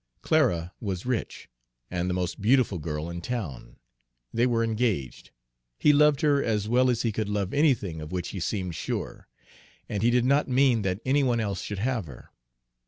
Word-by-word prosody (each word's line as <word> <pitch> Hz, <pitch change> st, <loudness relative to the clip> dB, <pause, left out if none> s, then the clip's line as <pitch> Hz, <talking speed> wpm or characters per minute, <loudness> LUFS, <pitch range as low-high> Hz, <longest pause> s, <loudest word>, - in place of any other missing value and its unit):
Clara 95 Hz, -, +2 dB
was 95 Hz, -2 st, -4 dB
rich, 125 Hz, -3 st, -3 dB, 0.4 s
and 90 Hz, 0 st, -1 dB
the 90 Hz, -, -1 dB
most 90 Hz, +2 st, -3 dB
beautiful 115 Hz, -4 st, +3 dB
girl 75 Hz, 0 st, -4 dB
in 85 Hz, 0 st, -6 dB
town; 85 Hz, -, -5 dB, 0.6 s
they 120 Hz, +2 st, +2 dB
were 115 Hz, -2 st, +1 dB
engaged; 110 Hz, -, -2 dB, 0.5 s
he 150 Hz, -, +4 dB
loved 150 Hz, 0 st, +4 dB
her 145 Hz, -3 st, +3 dB
as 105 Hz, -2 st, 0 dB
well 125 Hz, +3 st, +3 dB
as 120 Hz, -2 st, 0 dB
he 115 Hz, -, +1 dB
could 105 Hz, 0 st, -3 dB
love 100 Hz, -2 st, -2 dB
anything 115 Hz, -, +1 dB
of 75 Hz, -, -8 dB
which 90 Hz, -1 st, -3 dB
he 95 Hz, -, -5 dB
seemed 90 Hz, -1 st, -2 dB
sure; 80 Hz, -, -5 dB, 0.6 s
and 100 Hz, -, -3 dB
he 115 Hz, -, +4 dB
did 120 Hz, 0 st, +2 dB
not 140 Hz, +3 st, +3 dB
mean 130 Hz, -3 st, +3 dB
that 95 Hz, +1 st, -2 dB
any 140 Hz, +2 st, +3 dB
one 125 Hz, -3 st, +1 dB
else 100 Hz, -4 st, -2 dB
should 105 Hz, -, -5 dB
have 115 Hz, -3 st, -1 dB
her. 65 Hz, -4 st, -13 dB
110 Hz, 185 wpm, -27 LUFS, 90-125 Hz, 0.6 s, he